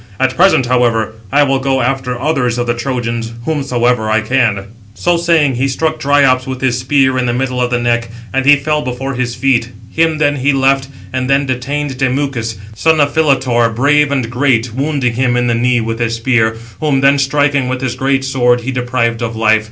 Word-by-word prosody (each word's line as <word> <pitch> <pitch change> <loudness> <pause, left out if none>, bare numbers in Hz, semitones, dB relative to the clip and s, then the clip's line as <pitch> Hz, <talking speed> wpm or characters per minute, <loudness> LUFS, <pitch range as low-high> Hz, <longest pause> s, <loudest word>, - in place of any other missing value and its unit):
At 130 0 +1
present, 180 -8 +4
however, 120 -3 +1 0.2
I 145 - +4
will 135 -1 +1
go 135 0 0
after 125 -1 -2
others 125 -5 0
of 120 - -1
the 120 - 0
Trojans, 120 -2 -3
whomsoever 125 -7 0
I 110 +1 +2
can." 110 -4 0 0.3
So 175 0 +1
saying, 165 -5 +2
he 135 +2 +1
struck 155 +4 -2
Dryops 135 -2 +2
with 130 -1 -5
his 125 -2 0
spear 130 0 +1
in 125 - -1
the 120 - -1
middle 125 0 -2
of 125 - 0
the 120 - 0
neck, 120 -1 -1 0.2
and 135 0 +1
he 145 +2 +6
fell 150 +2 -1
before 130 +1 -4
his 125 -2 -3
feet. 120 -2 +1 0.2
Him 160 -1 +1
then 145 -1 +1
he 135 +2 +1
left, 135 0 +1 0.3
and 130 0 -2
then 140 +1 +2
detained 135 +1 -3
Demuchus, 130 -4 -1 0.2
son 160 +8 +2
of 145 -1 +2
Philetor, 130 -6 +2
brave 145 +3 +2
and 130 -4 -1
great, 120 -2 0
wounding 135 -2 -1
[him] 125 0 0
in 125 - +1
the 120 - +1
knee, 120 +1 +1
with 115 +1 -4
his 115 -1 -1
spear, 115 -1 +1 0.2
whom 145 -3 0
then 140 +1 +4
striking 140 -1 +1
with 130 0 -3
his 130 -3 -2
great 135 +1 -1
sword, 125 -2 +1
he 130 +3 -4
deprived 120 -2 -1
of 115 -1 -3
life. 110 -1 +3
130 Hz, 205 wpm, -14 LUFS, 120-140 Hz, 0.3 s, he